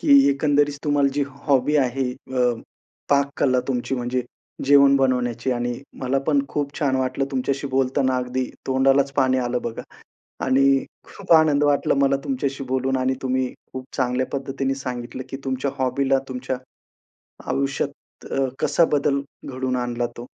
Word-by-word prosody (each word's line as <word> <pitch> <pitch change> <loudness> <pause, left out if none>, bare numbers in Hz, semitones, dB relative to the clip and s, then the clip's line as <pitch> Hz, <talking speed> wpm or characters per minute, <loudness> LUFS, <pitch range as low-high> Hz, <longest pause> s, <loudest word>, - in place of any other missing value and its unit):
की 140 0 +6
एकंदरीच 145 0 +1
तुम्हाला 145 -2 +3
जी 145 - +1 0.2
हॉबी 140 +1 +3
आहे 130 -1 +1
अ, 130 0 -5 0.7
पाककला 140 -2 +2
तुमची 130 0 -1
म्हणजे 125 0 -1 0.4
जेवण 140 0 +6
बनवण्याची 125 -2 0
आणि 120 0 -2 0.3
मला 130 +1 +1
पण 145 -2 +3
खूप 145 -1 -2
छान 135 -3 +1
वाटलं 130 +1 0
तुमच्याशी 140 +1 -1
बोलताना 130 0 +1
अगदी 125 +1 -1 0.2
तोंडालाच 135 +1 +3
पाणी 130 -2 +2
आलं 125 -1 -1
बघा 115 -1 -5 0.6
आणि 130 +1 +3 0.4
खूप 195 -3 -10
आनंद 155 -3 +5
वाटला 145 -1 +2
मला 140 0 +3
तुमच्याशी 140 - -2
बोलून 130 0 0
आणि 130 0 +1
तुम्ही 130 0 0 0.3
खूप 130 0 -6
चांगल्या 125 0 +1
पद्धतीने 135 0 -2
सांगितलं 125 -1 -5
की 135 - -5
तुमच्या 135 +1 -1
हॉबीला 135 +1 +1
तुमच्या 130 0 -4 0.9
आयुष्यात 140 +1 -3
अ, 135 0 +1
कसा 170 - +3
बदल 140 -1 +2 0.2
घडून 130 -1 -2
आणला 120 -1 -1
तो 120 - -7
135 Hz, 145 wpm, -23 LUFS, 130-140 Hz, 0.9 s, की